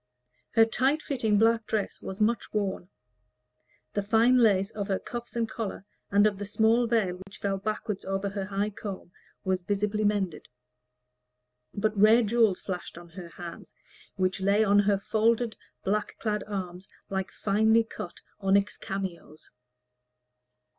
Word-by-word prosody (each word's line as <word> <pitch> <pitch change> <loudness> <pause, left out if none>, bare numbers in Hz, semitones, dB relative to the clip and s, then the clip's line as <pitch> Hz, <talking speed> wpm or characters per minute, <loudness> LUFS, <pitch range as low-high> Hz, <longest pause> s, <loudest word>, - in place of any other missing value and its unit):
Her 225 0 +6
tight 270 +7 +1
fitting 225 -7 +1
black 225 0 +3
dress 215 -2 -2
was 190 +2 -6
much 225 +2 +1
worn; 190 -3 -2 1.0
the 205 - 0
fine 225 +5 +4
lace 200 -3 +3
of 205 -2 -4
her 195 -2 +1
cuffs 240 +3 -7
and 230 -1 0
collar, 215 -3 -5 0.2
and 205 +1 +4
of 205 -2 +1
the 205 - -3
small 225 +3 +3
veil 205 -6 +1
that 195 +1 -14
fell 195 -1 -2
backward 215 0 -3
over 195 +1 -1
her 195 -1 -4
high 200 +2 -1
comb, 195 -3 -7 0.3
was 185 -1 0
visibly 205 +3 -1
mended; 200 -5 0 1.3
but 215 +1 0
rare 215 +4 +6
jewels 220 -3 +2
flashed 180 -3 -5
on 170 0 -11
her 175 0 -9
hands, 170 0 -10 0.4
which 185 0 0
lay 200 +3 +3
on 205 -1 +4
her 205 0 +3
folded 225 +3 +1 0.3
black 210 +2 -1
clad 210 -2 -1
arms 185 -2 -5 0.2
like 190 -1 -2
finely 220 +3 +3
cut 180 -5 -8 0.2
onyx 200 +1 +2
cameos. 185 -5 -6
205 Hz, 145 wpm, -28 LUFS, 195-220 Hz, 1.3 s, Her